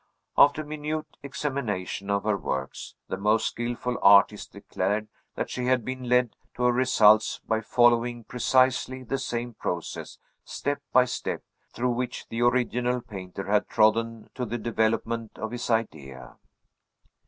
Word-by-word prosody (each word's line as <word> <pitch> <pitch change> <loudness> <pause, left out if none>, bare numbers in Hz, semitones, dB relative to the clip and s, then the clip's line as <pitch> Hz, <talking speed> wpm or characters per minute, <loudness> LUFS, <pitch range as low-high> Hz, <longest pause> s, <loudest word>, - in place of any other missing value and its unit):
After 145 +2 +5
minute 155 +1 -4 0.2
examination 130 -9 -3
of 100 0 +1
her 105 -1 +1
works, 65 -8 -5
the - - -3
most 105 +3 +2
skilful 120 +1 -3
artists 100 +1 +5
declared 105 +3 -3 0.3
that - - -3
she 125 - -3
had 125 -3 +1
been 130 -1 -5
led 125 -2 +2 0.2
to 125 - -3
her 125 - +5
results 110 -4 +4
by 110 0 +1
following 120 +1 +2
precisely 130 +2 +1
the 135 +2 -2
same 120 -1 -3
process 90 -5 -5 0.3
step 145 0 -3
by 125 0 +5
step 125 - -4 0.3
through 125 +1 -1
which 125 +1 -4
the 115 +1 -3
original 125 0 +1
painter 95 -5 -8
had 105 +1 +1
trodden 115 +1 +2
to 125 - -4
the 120 0 -3
development 115 0 -1
of 110 - -4
his 120 0 -5
idea. 80 - -3
120 Hz, 140 wpm, -26 LUFS, 105-125 Hz, 0.3 s, After